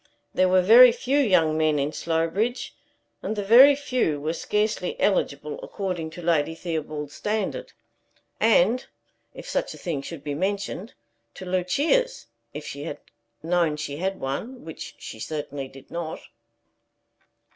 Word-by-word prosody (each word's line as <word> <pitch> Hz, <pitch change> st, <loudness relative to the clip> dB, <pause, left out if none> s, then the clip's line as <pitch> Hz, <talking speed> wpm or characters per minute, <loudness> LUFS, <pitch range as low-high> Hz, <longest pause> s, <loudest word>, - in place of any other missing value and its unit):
There 185 Hz, 0 st, +3 dB
were 185 Hz, 0 st, +4 dB
very 240 Hz, +5 st, +9 dB
few 250 Hz, +4 st, 0 dB
young 180 Hz, -, +3 dB
men 155 Hz, -1 st, +2 dB
in 140 Hz, +1 st, 0 dB
Slowbridge; 170 Hz, +9 st, -1 dB, 0.5 s
and 220 Hz, -, -3 dB
the 205 Hz, -, -2 dB
very 255 Hz, +8 st, +8 dB
few 255 Hz, -, -1 dB
were 155 Hz, +3 st, -2 dB
scarcely 215 Hz, -, -1 dB
eligible 475 Hz, -2 st, 0 dB
according 185 Hz, -, -4 dB
to 170 Hz, +2 st, -10 dB
Lady 160 Hz, -1 st, +1 dB
Theobald's 155 Hz, -3 st, -4 dB
standard, 210 Hz, -1 st, -3 dB, 0.7 s
and 225 Hz, +2 st, +3 dB, 0.5 s
if -, -, -9 dB
such -, -, -2 dB
a -, -, -12 dB
thing 165 Hz, -7 st, -3 dB
should 145 Hz, +1 st, -8 dB
be 145 Hz, -1 st, -3 dB
mentioned 200 Hz, -, -3 dB, 0.4 s
to 190 Hz, -, -8 dB
Lucia's, 285 Hz, -, +1 dB, 0.3 s
if -, -, -7 dB
she -, -, -6 dB
had -, -, -5 dB, 0.5 s
known 165 Hz, -2 st, +1 dB
she 145 Hz, -1 st, -5 dB
had 190 Hz, +3 st, -2 dB
one, 220 Hz, -, -5 dB
which 160 Hz, -, -8 dB
she 110 Hz, -, -9 dB
certainly 145 Hz, 0 st, -5 dB
did 135 Hz, 0 st, -15 dB
not. 170 Hz, -2 st, -4 dB
180 Hz, 145 wpm, -25 LUFS, 155-225 Hz, 0.7 s, very